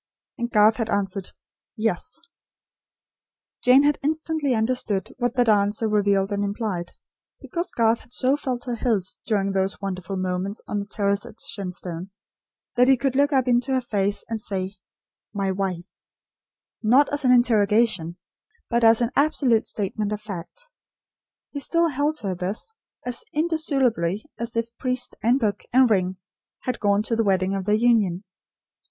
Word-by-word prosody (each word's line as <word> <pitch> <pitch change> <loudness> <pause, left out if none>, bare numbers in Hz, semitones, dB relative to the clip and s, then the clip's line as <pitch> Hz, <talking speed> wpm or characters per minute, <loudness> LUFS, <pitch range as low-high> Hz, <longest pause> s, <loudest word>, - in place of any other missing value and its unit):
And 235 0 -1
Garth 215 -1 +5
had 225 -2 -2
answered: 195 -2 -2 0.5
"Yes." 225 - -1 1.4
Jane 255 +2 +6
had 290 0 +2
instantly 310 -2 0
understood 220 -3 -1
what 245 0 0
that 245 -1 +3
answer 210 +1 +2
revealed 200 -2 +2
and 205 0 0
implied. 200 -4 -3 0.5
Because 345 0 -4
Garth 230 0 +2
had - - -18
so 255 +2 +2
felt 255 -4 -3
her 245 - -2
his 215 -6 0
during 200 -3 +1
those 195 0 -1
wonderful 195 -1 -4
moments 185 +2 -2
on 210 - -2
the 200 - -5
terrace 200 -1 0
at - - -13
Shenstone, 180 -2 -5 0.7
that 250 +1 +5
he 265 -1 +5
could 265 +1 -1
look 285 +2 +3
up 265 -2 +2
into 245 +2 +2
her 260 - +3
face 205 -4 -1
and 225 -1 -4
say, 190 -2 -4 0.6
"My 195 -1 0
wife" 185 -2 -4 0.8
not 255 +6 +5
as 290 0 +1
an 255 - +4
interrogation, 215 -7 +3 0.5
but 235 0 +2
as 225 +1 +6
an 235 +1 +1
absolute 275 -6 +2
statement 210 0 -2
of 210 - -2
fact, 210 - -8 0.8
he 285 - -4
still 335 +3 +1
held 295 +1 -1
her 195 -3 -2
this, 185 - -4 0.3
as 250 - -2
indissolubly 270 - +1
as 235 0 -4
if 230 0 -2
priest, 250 -1 -1
and 240 +6 +3
book, 210 -4 -1
and 255 -1 +5
ring, 185 -2 +1 0.4
had 255 -2 -3
gone 205 -1 +2
to 230 - 0
the 225 - +2
wedding 190 -1 +1
of 195 -1 -3
their 210 +1 +3
union. 215 -6 +2
220 Hz, 160 wpm, -24 LUFS, 195-250 Hz, 1.4 s, Jane